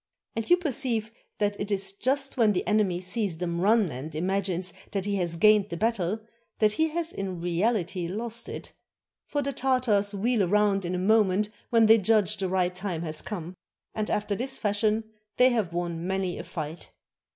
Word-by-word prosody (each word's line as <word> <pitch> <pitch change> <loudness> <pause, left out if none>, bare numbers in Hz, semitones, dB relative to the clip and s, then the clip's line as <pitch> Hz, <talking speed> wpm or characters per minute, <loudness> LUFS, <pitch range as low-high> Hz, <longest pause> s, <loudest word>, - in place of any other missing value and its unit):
And 225 - -3
you 355 - +7
perceive 250 -9 -1 0.3
that 205 -1 0
it 200 - -3
is 195 -1 -1
just 270 +6 0
when 225 -5 +4
the 180 - -1
enemy 205 -5 +1
sees 185 -2 -1
them 170 0 -2
run 210 -3 +3
and 145 +5 -7
imagines 185 +1 -1 0.2
that 195 -2 -1
he 200 -1 0
has 175 -3 +1
gained 210 +3 +5
the 170 - -4
battle, 220 -1 0 0.4
that 215 -1 +4
he 315 +9 +2
has 330 +1 -2
in 190 -3 -4
reahty 175 0 0
lost 230 +4 -4
it; - - -8 0.5
for 290 -1 -1
the 280 +1 -2
Tartars 235 -6 +1
wheel 215 -1 +1
round 200 0 +2
in 180 +1 -2
a - - -1
moment 205 +1 +3 0.2
when 230 -1 +5
they 225 +1 +7
judge 210 0 +2
the 190 -2 -2
right 180 -1 +1
time 180 -3 -3
has 155 -2 -2
come. 180 -3 -6 0.4
And 215 -1 -2
after 210 0 0
this 255 +6 -3
fashion 215 +1 +1 0.3
they 250 +1 +6
have 220 -8 0
won 170 0 -3
many 190 -2 -1
a - - -5
fight. 160 0 -6
205 Hz, 185 wpm, -27 LUFS, 180-225 Hz, 0.5 s, you